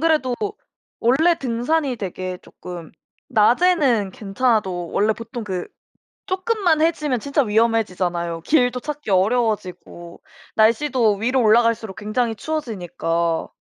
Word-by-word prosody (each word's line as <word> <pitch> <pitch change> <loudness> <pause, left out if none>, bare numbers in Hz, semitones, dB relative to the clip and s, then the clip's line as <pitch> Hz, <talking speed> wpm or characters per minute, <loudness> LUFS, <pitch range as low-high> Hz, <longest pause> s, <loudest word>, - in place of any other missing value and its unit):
그래도 305 -6 +2 0.7
원래 310 +9 +4
등산이 260 +2 -1
되게 185 -2 -5
쪼끔 175 -3 -10 0.4
낮에는 250 - +3
괜찮아도 195 -4 -1
원래 215 +2 +2
보통 230 +1 -7
그 185 -3 -4 0.6
쪼끔만 370 -4 +1
해지면 300 -6 +1
진짜 280 +4 +1
위험해지잖아요. 185 -7 0
길도 250 - +2
찾기 295 -5 -6
어려워지고 190 -4 -1 0.3
날씨도 230 0 +3
위로 250 +5 +1
올라갈수록 225 -2 +2
굉장히 225 +2 -1
추워지니까. 175 - -2
230 Hz, 290 characters per minute, -21 LUFS, 190-265 Hz, 0.7 s, 원래